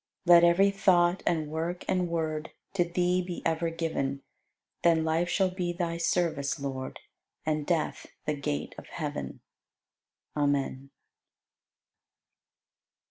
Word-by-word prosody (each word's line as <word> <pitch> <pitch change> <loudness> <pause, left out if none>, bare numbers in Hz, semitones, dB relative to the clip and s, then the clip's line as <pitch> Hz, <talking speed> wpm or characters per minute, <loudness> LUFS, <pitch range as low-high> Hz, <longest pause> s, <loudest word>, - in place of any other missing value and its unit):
Let 170 -1 +8
every 180 +4 +5
thought 180 -2 +3
and 155 -3 0
work 165 +3 -3
and 180 -2 +1
word 160 -2 -2 0.2
To 190 -3 +3
Thee 180 +1 +1
be 175 -1 -6
ever 165 +1 +1
given; 140 -5 -2 0.6
Then 165 -2 +4
life 165 +2 +1
shall 190 0 +2
be 180 -2 -2
Thy 170 -1 -2
service, 165 -5 0
Lord, 135 -1 -5 0.4
And 155 -1 -1
death 165 -3 -1 0.2
the 150 - +1
gate 75 - -3
of - - -13
heaven. - - -5 0.9
Amen. 140 -2 0
165 Hz, 120 wpm, -29 LUFS, 150-175 Hz, 0.9 s, Let